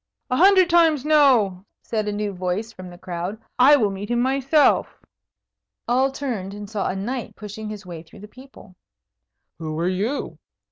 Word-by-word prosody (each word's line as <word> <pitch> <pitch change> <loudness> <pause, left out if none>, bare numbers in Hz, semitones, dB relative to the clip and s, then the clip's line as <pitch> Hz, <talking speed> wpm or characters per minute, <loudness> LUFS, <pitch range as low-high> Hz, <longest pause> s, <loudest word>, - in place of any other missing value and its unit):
"A - - +2
hundred 375 +1 +6
times 325 -5 +3
no!" 250 -12 +3 0.2
said 215 -2 -3
a - - -1
new 205 -1 -3
voice 185 +5 -3
from 185 -2 -10
the 175 - -12
crowd. 180 +4 -5 0.2
"I 275 +4 +7
will 215 -8 +1
meet 195 +1 -7
him 240 0 0
myself!" 270 +4 +2 0.9
All 260 +3 +2
turned 230 -9 -5
and 205 0 -8
saw 210 -1 -3
a - - -3
knight 235 +6 -5
pushing 210 +1 -8
his 210 -2 -8
way 170 -3 -8
through 165 +3 -16
the 210 - -10
people. 255 -5 -16 0.8
"Who 155 -1 -5
are 170 - 0
you?" 205 +10 -3
215 Hz, 175 wpm, -22 LUFS, 190-265 Hz, 0.9 s, I